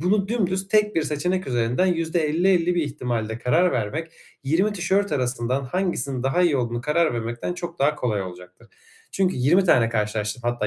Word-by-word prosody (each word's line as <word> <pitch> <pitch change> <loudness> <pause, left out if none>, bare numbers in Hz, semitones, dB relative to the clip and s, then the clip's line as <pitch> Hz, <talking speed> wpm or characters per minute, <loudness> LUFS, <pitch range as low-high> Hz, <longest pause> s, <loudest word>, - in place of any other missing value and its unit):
Bunu 195 +3 +1
dümdüz, 195 -4 -1
tek 210 -1 +2
1 165 - +2
seçenek 180 +6 -1
üzerinden 120 +8 +1
%50-50 170 +1 +1
bir 175 - +1
ihtimalle 120 -6 -3
karar 170 +10 +2
vermek, 145 +9 -3 0.3
20 175 +9 +2
tişört 200 +1 0
arasından 125 0 -1
hangisinin 140 -5 -2
daha 135 +7 +1
iyi 160 -6 +3
olduğuna 120 -1 -2
karar 155 +1 +1
vermekten 120 +7 -3
çok 175 -1 -7
daha 145 +2 +2
kolay 110 -8 -1
olacaktır. 90 -1 -11 0.4
Çünkü 190 -5 +1
20 160 +10 +3
tane 120 -10 +4
karşılaştırıp 105 +1 -2
hatta 120 -3 -1
150 Hz, 165 wpm, -23 LUFS, 120-180 Hz, 0.4 s, tane